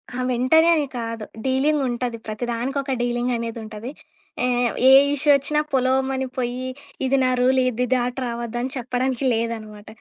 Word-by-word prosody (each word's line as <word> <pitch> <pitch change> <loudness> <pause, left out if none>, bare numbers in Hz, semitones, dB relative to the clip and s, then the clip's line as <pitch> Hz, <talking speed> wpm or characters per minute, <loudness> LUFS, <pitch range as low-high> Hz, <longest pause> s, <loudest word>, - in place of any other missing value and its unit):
ఆ! - - -4
వెంటనే 255 +7 +4
అని 295 -3 0
కాదు. 230 -1 -4 0.2
డీలింగుంటది. 260 -3 0
ప్రతిదానికొక 245 +5 -3
డీలింగనేదుంటది. 235 -2 -3 0.5
ఏవ్ 245 -1 +1
ఏ - - +8 0.2
ఇష్యూ 290 +1 -1
ఒచ్చినా 300 +2 0
పొలోమని 265 0 +1
పోయ్యి 250 +1 -2 0.4
ఇది 270 +1 +2
నా 255 - +3
రూల్ 260 +1 +3
ఇది 250 +1 -1
దాటి 245 +1 -1
రావద్దని 240 +1 -3
చెప్పడానికి 255 +1 -2
లేదనమాట. 220 -2 -4
250 Hz, 125 wpm, -22 LUFS, 235-265 Hz, 0.5 s, ఏ